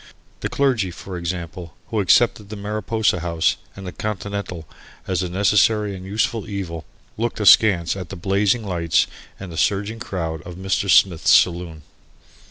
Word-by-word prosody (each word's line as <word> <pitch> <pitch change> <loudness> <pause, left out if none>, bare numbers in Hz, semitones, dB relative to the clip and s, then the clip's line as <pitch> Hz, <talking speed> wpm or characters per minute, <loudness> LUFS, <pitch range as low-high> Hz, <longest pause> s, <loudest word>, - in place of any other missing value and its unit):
The - - -3
clergy, 130 -9 +1
for 90 +2 -8
example, 85 -1 -5
who 110 - -1
accepted 105 +1 +3
the 110 - -6
Mariposa 105 -1 -1
House 85 -1 0 0.2
and 95 - -9
the 90 - -5
Continental 100 -5 -5 0.4
as 95 -2 -1
a 90 - -3
necessary 105 +2 +2
and 95 - -9
useful 105 +2 -2
evil, 90 -5 -5 0.3
looked 115 0 -2
askance 100 -5 +5
at 95 -4 -7
the - - -6
blazing 100 +5 +1
lights 85 -4 +1 0.3
and 95 -2 -8
the 80 - -8
surging 105 +5 0
crowd 80 -8 -4
of 90 - -9
Mr. 95 +1 -1
Smith's 90 -3 +4
saloon. 85 -3 +3
95 Hz, 155 wpm, -21 LUFS, 85-105 Hz, 0.4 s, askance